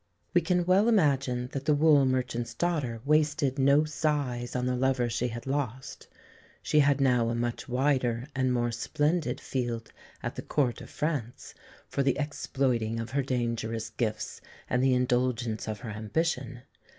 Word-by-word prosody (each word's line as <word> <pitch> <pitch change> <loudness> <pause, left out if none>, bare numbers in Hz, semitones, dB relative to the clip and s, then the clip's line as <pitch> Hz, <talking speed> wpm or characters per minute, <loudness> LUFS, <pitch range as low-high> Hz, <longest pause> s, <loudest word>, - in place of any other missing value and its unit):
We 175 - +5
can 175 +1 +1
well 195 +5 +4
imagine 135 - +2
that 140 -1 -4
the 150 - +4
wool 145 -2 +5
merchant's 125 -2 -1
daughter 145 -10 -1
wasted 150 -2 +2
no 140 +3 +5
sighs 145 -6 -1
on 125 0 0
the 125 0 0
lover 125 -2 +1
she 120 +2 0
had 120 0 -6
lost. 130 -2 -4 0.6
She 150 - +3
had 145 -1 +4
now 125 -4 +3
a 115 - -1
much 120 +3 -3
wider 125 -2 +1
and 130 -1 +1
more 120 -1 +1
splendid 150 +8 0
field 120 -3 -3 0.3
at - - -3
the - - -6
Court 130 -5 0
of - - -10
France, 140 -7 -3 0.3
for - - -1
the 135 -1 +2
exploiting 130 -6 -1
of 115 0 -5
her 140 +2 +1
dangerous 115 -3 -2
gifts 110 -3 -3 0.3
and 125 +1 +1
the 130 -1 +4
indulgence 125 -3 0
of 110 0 -4
her 115 -3 -6
ambition. 120 +3 -2
130 Hz, 165 wpm, -28 LUFS, 120-145 Hz, 0.6 s, We